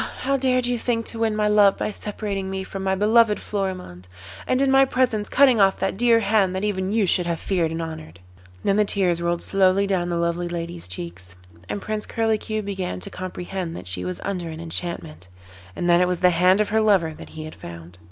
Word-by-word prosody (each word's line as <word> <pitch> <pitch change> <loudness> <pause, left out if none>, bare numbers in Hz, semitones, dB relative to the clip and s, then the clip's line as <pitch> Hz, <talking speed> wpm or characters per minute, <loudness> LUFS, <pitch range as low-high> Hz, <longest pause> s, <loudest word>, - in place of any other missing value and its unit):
how 275 +1 +1
dared 255 -2 +1
you 245 -1 0
think 230 -1 -1
to 230 - -5
win 225 -1 +1
my 210 0 +1
love 205 -2 +5
by - - -2
separating 200 -2 -4
me 190 0 -3
from 195 0 -7
my 190 0 +1
beloved 215 +2 +4
Florimond, 185 - -5 0.4
and 255 - +1
in 275 -1 +2
my 270 0 +6
presence 250 -5 0
cutting 260 -6 +5
off 195 0 +4
that 195 - -1
dear 230 +1 +4
hand 200 -4 +2
that 190 - -2
even 190 -2 -1
you 215 -1 +2
should 180 -1 +1
have 170 -2 -2
feared 175 -4 0
and 165 +1 -3
honoured?' 85 - -8
And - - -23 0.5
then 195 - +3
the 210 - +5
tears 180 -4 +1
rolled 170 0 -1
slowly 195 0 +3
down 185 -3 -1
the 170 - -1
lovely 170 +1 -1
lady's 170 - -5
cheeks, 90 0 -8 0.3
and 200 - -4
Prince 215 0 -3
Curlicue 220 -1 -1
began 190 - -4
to 90 - -8
comprehend 180 -1 -5
that - - -8
she 90 -1 +2
was 90 -1 -4
under 180 -4 -3
an 160 0 -7
enchantment, 165 - -5 0.5
and 175 - -2
that 175 0 +5
it 180 - +3
was 180 -1 -2
the 180 0 +5
hand 180 +4 +4
of 210 - -1
her 220 +1 +2
lover 190 -7 +3
that - - -11
he 155 - -5
had 155 - -8
found. 85 +1 -11
190 Hz, 225 wpm, -23 LUFS, 170-215 Hz, 0.5 s, my